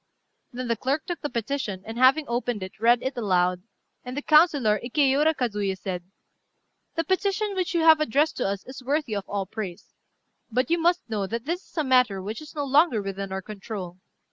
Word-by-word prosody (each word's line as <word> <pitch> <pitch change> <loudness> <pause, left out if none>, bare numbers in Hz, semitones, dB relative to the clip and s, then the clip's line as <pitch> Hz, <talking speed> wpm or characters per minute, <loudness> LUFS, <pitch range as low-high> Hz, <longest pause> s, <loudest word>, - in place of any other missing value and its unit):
Then 250 0 -5
the 230 - +1
clerk 275 +7 -1
took 350 -4 -5
the 295 - -3
petition, 235 -5 -3
and, 225 - -6
having 260 +5 +5
opened 235 -3 -2
it, 185 +3 -9
read 235 +2 +4
it 265 +1 -2
aloud; 180 -5 +1 0.4
and 250 +2 -7
the 290 - -3
councillor, 295 - +4
Ikéura 285 +4 +2
Kazuyé, 205 -7 -1
said 180 -2 -4 0.9
"The 330 - 0
petition 400 +3 0
which 370 -1 -2
you 335 - +3
have 320 -1 +7
addressed 300 +3 +2
to 245 - 0
us 195 0 -3
is 260 0 -9
worthy 275 -3 -1
of 200 -1 -5
all 200 -1 -2
praise. 190 -3 -7 0.6
But 250 +5 0
you 340 - +3
must 350 +2 +2
know 210 -4 -2
that 230 +4 -4
this 345 +5 -3
is - - -24
a 310 - +2
matter 250 -7 +3
which 210 +6 -5
is 310 +1 -12
no 290 - -1
longer 280 -3 +4
within 195 -1 -5
our 190 0 -4
control. 195 -3 -7
245 Hz, 200 wpm, -25 LUFS, 205-300 Hz, 0.9 s, have